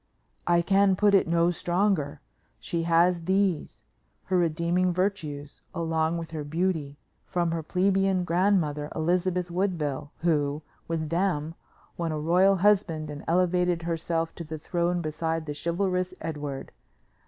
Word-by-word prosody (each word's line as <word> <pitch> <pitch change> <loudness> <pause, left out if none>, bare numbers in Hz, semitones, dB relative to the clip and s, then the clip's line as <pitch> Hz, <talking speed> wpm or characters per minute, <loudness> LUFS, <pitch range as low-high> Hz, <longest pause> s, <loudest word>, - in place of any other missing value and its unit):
I 170 0 +4
can 195 +1 +4
put 205 +2 +3
it 195 - +4
no 170 +1 +3
stronger. 175 -4 0 0.4
She 165 +8 -3
has 170 0 +3
these, 190 -3 0 0.4
her 185 - 0
redeeming 170 +2 +1
virtues, 160 -6 -3
along 165 -1 0
with 165 -1 -6
her 155 -2 -4
beauty, 155 -2 -2 0.3
from 175 -2 -1
her 165 0 -2
plebeian 190 +2 +1
grandmother, 170 -5 +1
Elizabeth 180 +2 0
Woodville, 155 -6 -2
who, 150 -3 +1 0.2
with 160 -2 -2
them, 165 -3 0 0.4
won 170 -1 -1
a 155 - -2
royal 180 +6 +4
husband 185 -6 +2
and 145 +1 -8
elevated 180 0 +2
herself 165 0 -1
to 170 - -7
the 160 0 -6
throne 175 +2 -1
beside 160 +1 -2
the 150 - -4
chivalrous 180 +3 -1
Edward. 145 -4 -5
170 Hz, 135 wpm, -27 LUFS, 155-180 Hz, 0.4 s, I